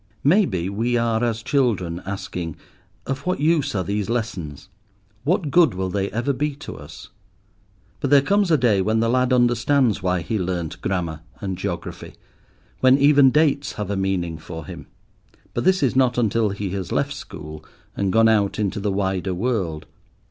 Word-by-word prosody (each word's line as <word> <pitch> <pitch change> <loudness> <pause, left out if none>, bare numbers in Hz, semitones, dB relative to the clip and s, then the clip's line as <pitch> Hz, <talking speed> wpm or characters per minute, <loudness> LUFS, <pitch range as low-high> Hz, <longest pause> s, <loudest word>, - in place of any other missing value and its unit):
Maybe, 145 - +2
we 115 +5 0
are 115 -1 +1
as 115 -2 -1
children, 100 -12 0
asking, 95 -4 -5 0.5
"Of 135 0 -2
what 180 - 0
use 150 -4 +1
are 95 - 0
these 100 +2 -2
lessons? 95 - -4 0.6
What 160 -2 +1
good 165 - +4
will 95 0 -2
they 100 +1 -1
ever 120 +5 -1
be 145 +2 -2
to 145 - -9
us?" 80 +7 -11 0.9
But 140 - -1
there 140 -1 +6
comes 200 +2 +2
a 160 - +5
day 115 -7 +3
when 110 +3 +1
the 115 0 +1
lad 130 0 +2
understands 120 -1 +2
why 90 -1 0
he 100 +7 -2
learnt 85 -3 -3
grammar 85 -5 -2 0.2
and 95 -2 -3
geography, - - -6 0.6
when 130 +1 +5
even 140 -1 +6
dates 145 0 +2
have 105 -2 -4
a - - 0
meaning 90 -4 -1
for 80 0 -8
him. - - -9 0.7
But - - -2
this 185 -3 +3
is 130 -2 +1
not 130 -2 +3
until 115 -2 +2
he 100 -1 -4
has 95 -2 -4
left - - 0
school, 75 +1 -9 0.3
and 100 -1 0
gone 115 +2 +5
out 105 -3 +2
into 105 -1 -1
the 100 0 -1
wider 95 -1 -1
world. 95 -8 -2
110 Hz, 175 wpm, -22 LUFS, 95-130 Hz, 0.9 s, there